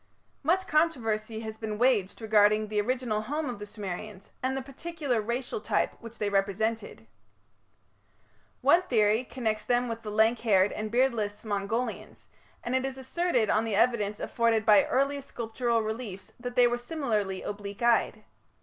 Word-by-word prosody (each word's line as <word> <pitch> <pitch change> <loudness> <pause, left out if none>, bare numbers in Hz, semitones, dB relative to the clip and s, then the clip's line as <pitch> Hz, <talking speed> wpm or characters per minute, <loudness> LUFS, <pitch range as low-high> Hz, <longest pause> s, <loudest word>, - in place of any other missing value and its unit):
Much 360 +6 +2
controversy 225 - 0
has 220 -1 -7
been 215 -2 -4
waged 230 -4 +1
regarding 215 0 +4
the 210 -1 +1
original 240 -2 -1
home 295 +7 -3
of 245 -5 -5
the 210 - -7
Sumerians 200 -1 -7
and 265 +1 -1
the - - -2
particular 275 -3 -3
racial 235 +1 -3
type 210 - 0
which 230 0 -11
they 210 - -1
represented. 200 - -1 1.6
One 295 +7 +5
theory 220 - +2
connects 220 -4 -2
them 245 +2 +1
with 230 -1 -4
the 215 - -6
lank 220 +2 +3
haired 200 -4 +3
and 215 0 -4
beardless 230 -4 0
Mongolians, 215 +4 -3 0.3
and 245 +2 -1
it 260 - +1
is 265 0 -4
asserted 265 - 0
on 215 - +2
the 225 -3 -1
evidence 210 -2 +2
afforded 230 -2 +1
by 210 -2 +6
early 275 +2 +1
sculptural 235 -2 -1
reliefs 215 -4 -6
that 245 0 -6
they 245 - +6
were 240 0 +1
similarly 225 -9 -2
oblique 205 +2 -6
eyed. 230 -2 +2
225 Hz, 160 wpm, -28 LUFS, 210-250 Hz, 1.6 s, by